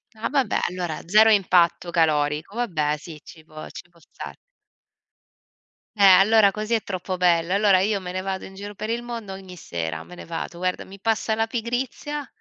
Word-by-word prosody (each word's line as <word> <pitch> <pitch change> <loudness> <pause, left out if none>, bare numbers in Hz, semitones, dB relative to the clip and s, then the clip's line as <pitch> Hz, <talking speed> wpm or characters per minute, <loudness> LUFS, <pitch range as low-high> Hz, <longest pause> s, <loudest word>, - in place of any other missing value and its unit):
Ah, 215 - -3
vabbè 275 -3 +1
allora 175 -3 -4
0 215 +3 +6
impatto 180 -3 +3
calorico, 155 +2 0
vabbè 155 -11 -1
sì, 155 0 -11
ci 160 -2 -14
può 155 -1 -10
ci 180 - -11
può 170 - -24
star 160 - -10 1.6
Eh, - - -3
allora 200 +2 +7
così 215 +3 -4
è 225 - +2
troppo 185 -1 -4
bello. 175 -1 +2
Allora 200 -2 +4
io 200 +1 +1
me 180 -1 -6
ne 185 - -3
vado 190 0 -4
in 190 - -12
giro 205 +1 -8
per 215 +2 -6
il 235 +1 -2
mondo 230 -5 -6
ogni 190 -1 -10
sera, 80 - -5
me 180 - -13
ne - - -10
vado. 170 +1 -6
Guarda 185 +1 -2
mi 195 +1 -13
passa 220 +1 0
la 225 0 +1
pigrizia 245 +5 -4
190 Hz, 190 wpm, -23 LUFS, 170-220 Hz, 1.6 s, allora